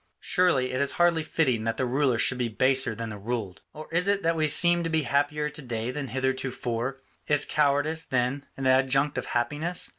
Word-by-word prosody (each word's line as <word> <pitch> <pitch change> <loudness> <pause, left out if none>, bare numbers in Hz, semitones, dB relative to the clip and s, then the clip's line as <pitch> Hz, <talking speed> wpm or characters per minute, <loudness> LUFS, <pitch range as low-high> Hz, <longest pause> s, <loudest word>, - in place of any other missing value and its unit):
Surely 160 -9 +1
it 130 +2 -1
is 140 - +2
hardly 175 -1 +2
fitting 135 -7 0
that 115 0 -2
the 130 - 0
ruler 130 -1 +1
should 125 +2 +1
be 120 - 0
baser 130 0 +2
than 115 0 -5
the 105 - -8
ruled. 105 -3 -4
Or 155 0 -10
is 175 +3 0
it 200 0 +1
that 165 0 +1
we 155 -1 +1
seem 175 +3 +4
to 165 - -2
be 160 -1 0
happier 145 +3 0
to 150 +1 -8
day 120 -2 -4
than 140 +1 -5
heretofore? 130 0 -3 0.2
Is 145 -1 +3
cowardice, 150 +2 +1
then, 130 +2 -1
an 135 - -4
adjunct 135 +2 +2
of - - -7
happiness? 145 +9 -1
135 Hz, 205 wpm, -26 LUFS, 125-155 Hz, 0.2 s, seem